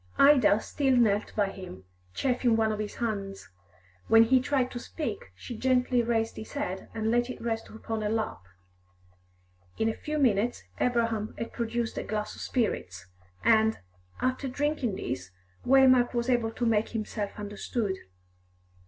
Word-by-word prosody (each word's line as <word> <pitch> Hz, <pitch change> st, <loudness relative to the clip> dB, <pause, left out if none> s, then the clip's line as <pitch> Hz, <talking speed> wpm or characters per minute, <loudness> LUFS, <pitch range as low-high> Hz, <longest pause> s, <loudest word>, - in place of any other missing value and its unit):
Ida 255 Hz, -8 st, +6 dB
still 270 Hz, -3 st, +1 dB
knelt 215 Hz, -3 st, +2 dB
by 200 Hz, -2 st, +1 dB
him, 140 Hz, -, -9 dB, 0.3 s
chafing 250 Hz, -3 st, +2 dB
one 220 Hz, -1 st, +2 dB
of 210 Hz, -, -3 dB
his 210 Hz, -1 st, -4 dB
hands; 200 Hz, -4 st, -4 dB, 0.6 s
when 225 Hz, 0 st, +7 dB
he 255 Hz, +3 st, +4 dB
tried 260 Hz, -1 st, 0 dB
to 245 Hz, -, -5 dB
speak, 235 Hz, -, -5 dB
she 240 Hz, -, -8 dB
gently 250 Hz, 0 st, +2 dB
raised 225 Hz, -1 st, 0 dB
his 220 Hz, -, -8 dB
head 190 Hz, -10 st, -4 dB
and 220 Hz, 0 st, 0 dB
let 240 Hz, +1 st, +2 dB
it 255 Hz, -, -6 dB
rest 225 Hz, -1 st, -3 dB
upon 220 Hz, 0 st, -5 dB
her 210 Hz, -, -1 dB
lap. 220 Hz, -, -2 dB, 1.4 s
In 220 Hz, -, +2 dB
a -, -, -1 dB
few 305 Hz, +5 st, -4 dB
minutes 240 Hz, -4 st, +2 dB, 0.2 s
Abraham 230 Hz, -3 st, 0 dB
had 230 Hz, -, -5 dB
procured 235 Hz, 0 st, -2 dB
a -, -, -3 dB
glass 210 Hz, -1 st, -3 dB
of -, -, -10 dB
spirits, 95 Hz, -, -2 dB, 0.4 s
and, 220 Hz, -, +4 dB, 0.4 s
after 255 Hz, +2 st, -1 dB
drinking 270 Hz, -4 st, -1 dB
this, 125 Hz, -, -4 dB, 0.4 s
Waymark 255 Hz, -2 st, +5 dB
was 240 Hz, +2 st, +1 dB
able 240 Hz, -2 st, +2 dB
to 240 Hz, +2 st, -3 dB
make 220 Hz, -1 st, +2 dB
himself 215 Hz, -2 st, -4 dB
understood. 205 Hz, 0 st, -3 dB
225 Hz, 155 wpm, -28 LUFS, 210-250 Hz, 1.4 s, when